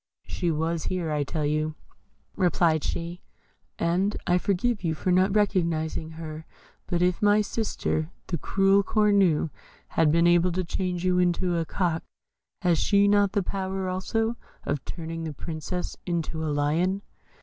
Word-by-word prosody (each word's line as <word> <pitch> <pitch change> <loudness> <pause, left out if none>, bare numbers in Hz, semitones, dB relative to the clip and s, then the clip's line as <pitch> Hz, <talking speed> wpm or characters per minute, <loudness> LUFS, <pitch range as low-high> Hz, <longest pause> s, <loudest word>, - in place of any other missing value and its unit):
"She 175 - -2
was 160 +1 -1
here, 180 -4 -2
I 150 -1 +1
tell 150 +2 -2
you," 155 +1 0 0.6
replied 170 -4 +2
she, 170 +2 -4 0.6
"and 185 +5 +1
I 180 0 +3
forgive 200 +4 0
you 160 -2 0
for 180 +5 -1
not 185 +2 +3
recognising 165 -6 0
her; 160 -1 -8 0.4
but 175 -1 +1
if 180 -1 +1
my 205 0 +5
sister, 200 -7 -2 0.2
the 170 -4 -3
cruel 195 +5 +3
Cornue, 200 -7 +3 0.4
has 165 - +2
been 170 +3 +4
able 175 +1 +4
to 185 +1 0
change 180 0 -2
you 180 0 +3
into 180 0 +1
a 165 -1 0
cock, 170 -2 -1 0.6
has 175 -3 +3
she 200 -1 +4
not 205 -1 +3
the 200 -2 +1
power 190 0 -3
also 225 +5 -1 0.3
of 145 -1 -2
turning 165 -1 -5
the 160 -2 -4
Princess 165 +4 -4
into 165 -2 -2
a 155 - -1
lion?" 160 +7 +1
175 Hz, 155 wpm, -26 LUFS, 160-190 Hz, 0.6 s, my